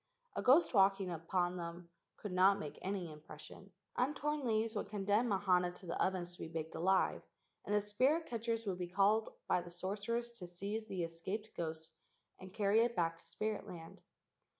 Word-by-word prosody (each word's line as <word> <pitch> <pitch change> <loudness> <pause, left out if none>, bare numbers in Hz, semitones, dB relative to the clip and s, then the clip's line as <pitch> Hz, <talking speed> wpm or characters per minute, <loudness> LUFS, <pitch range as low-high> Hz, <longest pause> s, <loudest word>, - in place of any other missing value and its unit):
A - - -1
ghost 270 +6 +5
walking 195 -2 +4
upon 175 +2 0
them 170 0 -7 0.3
could 205 - -6
not 190 +2 +5
make 150 - -6
any 185 -4 -3
impression. 155 +5 -11 0.2
Untorn 295 +3 0
leaves 220 0 +1
would 205 - -2
condemn 205 +3 +2
Mahana 185 -3 +3
to 185 - -12
the 170 - 0
ovens 180 -2 -1
to - - -15
be - - -4
baked 160 -1 -4
alive, 190 +3 +2 0.4
and 210 - +1
the 210 - +4
spirit 260 +11 +2
catchers 230 -1 -2
would 185 -3 -2
be 180 - -2
called 205 +4 +3 0.2
by 180 - +3
the 175 - -9
sorcerers 205 +7 -2
to 200 -7 -8
seize 200 +5 -4
the 185 -4 -2
escaped 190 +6 -5
ghost 160 -1 -4 0.5
and 185 0 -10
carry 205 +2 +3
it 235 0 +1
back 165 -1 +1
to - - -15
spirit 215 +6 -3
land. 165 -2 -9
195 Hz, 180 wpm, -36 LUFS, 175-215 Hz, 0.5 s, ghost